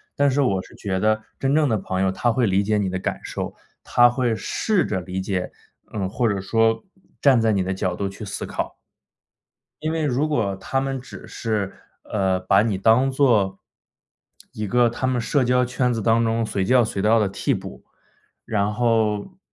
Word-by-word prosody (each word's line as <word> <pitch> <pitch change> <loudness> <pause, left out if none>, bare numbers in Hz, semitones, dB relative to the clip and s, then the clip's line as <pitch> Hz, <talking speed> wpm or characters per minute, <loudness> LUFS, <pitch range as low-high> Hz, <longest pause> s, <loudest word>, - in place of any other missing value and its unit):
但 140 -1 +3
是 135 - 0
我 100 -9 +1
是 - - -17
觉 95 -2 -3
得 110 0 +2 0.2
真 135 0 0
正 155 0 +3
的 110 -4 +1
朋 95 -1 -3
友 95 -1 +1
他 120 +4 +1
会 120 +1 +1
理 95 +1 +2
解 105 +1 +1
你 100 -2 0
的 95 - -2
感 90 - -3
受， - - -4 0.3
他 120 0 +5
会 120 -1 0
试 210 - 0
着 95 -3 -2
理 90 +1 -5
解， 95 -1 -2 0.4
呃， 100 -3 -2
或 115 +5 0
者 100 -2 -1
说 115 +3 +1 0.4
站 135 -4 +5
在 110 -1 +3
你 100 -2 +1
的 95 +1 -1
角 95 -1 -1
度 100 +2 -2
去 100 +2 -8
思 100 - -5
考。 - - -4 1.0
因 155 +1 -2
为 160 -1 -1
如 145 +3 0
果 110 -10 0
他 135 +7 -2
们 135 -1 -3
只 130 - -11
是， 105 -4 -2 0.3
呃， 95 -3 0
把 95 +2 +3
你 110 -3 0
当 115 +7 +3
作 110 -8 +2 0.9
一 105 - -4
个 120 +4 +3
他 120 +3 -3
们 130 -1 +1
社 130 +3 +1
交 125 +1 +2
圈 125 0 0
子 115 - -2
当 115 +2 +3
中 115 0 0
随 100 -3 -1
叫 120 +4 +4
随 100 - -3
到 110 +3 +4
的 105 - +2
替 100 - -1
补， - - -7 0.6
然 105 -1 0
后 115 - 0
110 Hz, 215 characters per minute, -23 LUFS, 100-125 Hz, 1.0 s, 他